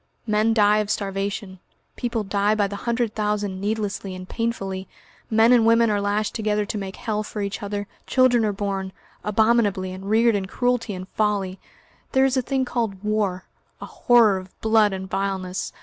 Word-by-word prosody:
"Men 215 0 +2
die 210 -1 +4
of 210 -1 -2
starvation; 195 -1 -3 0.4
people 235 -3 -2
die 205 +1 +1
by 210 -1 +2
the 200 +1 -4
hundred 235 -2 0
thousand 210 -3 -2
needlessly 205 -2 -2
and 185 0 -8
painfully; 195 -5 -3 0.4
men 225 +2 +5
and 240 -2 +5
women 230 0 +4
are 205 -1 +1
lashed 205 +1 0
together 210 -2 0
to 210 - -4
make 195 -1 -6
hell 215 -1 -2
for 215 0 -6
each 200 +3 -4
other; 205 0 -3 0.2
children 255 -3 +4
are 215 - +1
born 195 -1 -3 0.3
abominably, 210 -3 +2
and 190 +1 -7
reared 230 +2 +4
in 195 -2 -1
cruelty 245 -1 -1
and 185 0 -7
folly; 200 -3 -1 0.5
there 265 -1 +5
is 265 0 +1
a 260 - +2
thing 265 +1 -1
called 225 -6 -3
war, 210 -3 -1 0.3
a - - -7
horror 230 -5 +4
of 185 0 -11
blood 220 -1 +3
and 190 0 -5
vileness. 190 -1 -3
210 Hz, 180 wpm, -23 LUFS, 195-225 Hz, 0.5 s, men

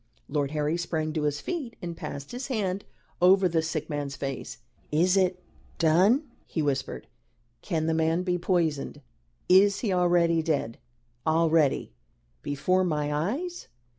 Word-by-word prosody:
Lord 145 -2 -1
Harry 150 +2 0
sprang 160 -2 -2
to 155 - -1
his 145 -1 -1
feet 290 -10 -4
and 170 -1 -5
passed 140 -3 -7
his 250 +2 -5
hand 200 -7 -2 0.4
over 190 +1 +6
the 165 -2 +1
sick 155 -1 -3
man's 145 -2 -3
face. 135 -2 -5 0.3
"Is 175 +5 +3
it 185 -1 +1 0.3
done?" 185 - +4 0.2
he 160 - -2
whispered. 140 -2 -2 0.6
"Can 160 -5 -1
the 160 - +1
man 160 +2 +1
be 180 -1 0
poisoned? 170 -5 0 0.5
Is 195 +2 +5
he 210 -6 0
already 175 -2 +3
dead? 145 -8 -1 0.5
already? 160 - +2 0.5
Before 185 +7 +1
my 150 -4 -1
eyes?" 275 - -3
165 Hz, 140 wpm, -27 LUFS, 150-185 Hz, 0.6 s, over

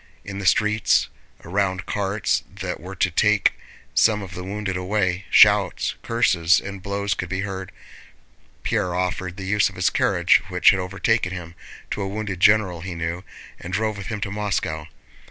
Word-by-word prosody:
In 100 0 -6
the 100 - -2
streets, 105 +1 +3 0.4
around 95 +1 -1
carts 100 0 0
that 95 -1 -5
were 95 +4 -9
to 90 0 +1
take 105 +3 +3 0.4
some 105 -2 +3
of 95 -1 -9
the 90 - -6
wounded 100 0 -4
away, 95 0 -1
shouts, - - +5
curses, 90 -8 +3
and 100 -1 -8
blows 100 +2 -1
could 90 - -5
be 95 +1 -2
heard. 95 -2 -5 0.9
Pierre 90 -1 0
offered 90 0 -2
the 95 - -6
use 105 +1 +2
of 95 - -14
his 90 -1 +1
carriage, - - +3
which - - +5
had 95 - 0
overtaken 95 +1 0
him, 85 -2 -7 0.4
to - - -2
a 100 - -2
wounded 100 -2 -4
general 100 -4 +3
he 90 -1 -6
knew, 85 +2 -3 0.4
and 90 - -8
drove 110 +2 0
with 100 -1 -7
him 110 -2 -4
to 100 -2 -3
Moscow. 95 -7 -2
95 Hz, 175 wpm, -23 LUFS, 90-105 Hz, 0.9 s, shouts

